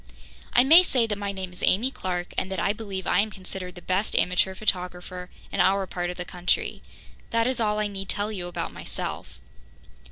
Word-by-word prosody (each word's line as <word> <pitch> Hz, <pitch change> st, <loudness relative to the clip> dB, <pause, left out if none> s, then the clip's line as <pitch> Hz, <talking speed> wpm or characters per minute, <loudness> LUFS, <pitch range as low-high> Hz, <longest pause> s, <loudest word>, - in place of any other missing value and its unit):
I 245 Hz, -, +7 dB
may 320 Hz, +7 st, +9 dB
say 255 Hz, -9 st, +2 dB
that 210 Hz, -2 st, -3 dB
my 200 Hz, -1 st, -2 dB
name 190 Hz, -2 st, -5 dB
is 180 Hz, -, -10 dB
Amy 235 Hz, +8 st, +3 dB
Clarke, 180 Hz, -6 st, -3 dB
and 190 Hz, -, -2 dB
that 190 Hz, -, -2 dB
I 200 Hz, -, +2 dB
believe 200 Hz, -4 st, -5 dB
I -, -, +3 dB
am 215 Hz, +2 st, +2 dB
considered 185 Hz, -2 st, -6 dB
the 175 Hz, -, -11 dB
best 190 Hz, +3 st, 0 dB
amateur 180 Hz, +1 st, +2 dB
photographer 180 Hz, -2 st, -2 dB, 0.2 s
in -, -, -3 dB
our 195 Hz, 0 st, +4 dB
part 175 Hz, -1 st, -3 dB
of 180 Hz, -, -5 dB
the 180 Hz, -, -4 dB
country. 180 Hz, 0 st, -1 dB, 0.5 s
That 230 Hz, 0 st, +2 dB
is 255 Hz, 0 st, 0 dB
all 210 Hz, -2 st, +2 dB
I 215 Hz, -, +1 dB
need 195 Hz, -1 st, -5 dB
tell 205 Hz, +2 st, 0 dB
you 180 Hz, -4 st, -4 dB
about 175 Hz, -, -4 dB
myself. -, -, -5 dB
190 Hz, 210 wpm, -26 LUFS, 180-215 Hz, 0.5 s, may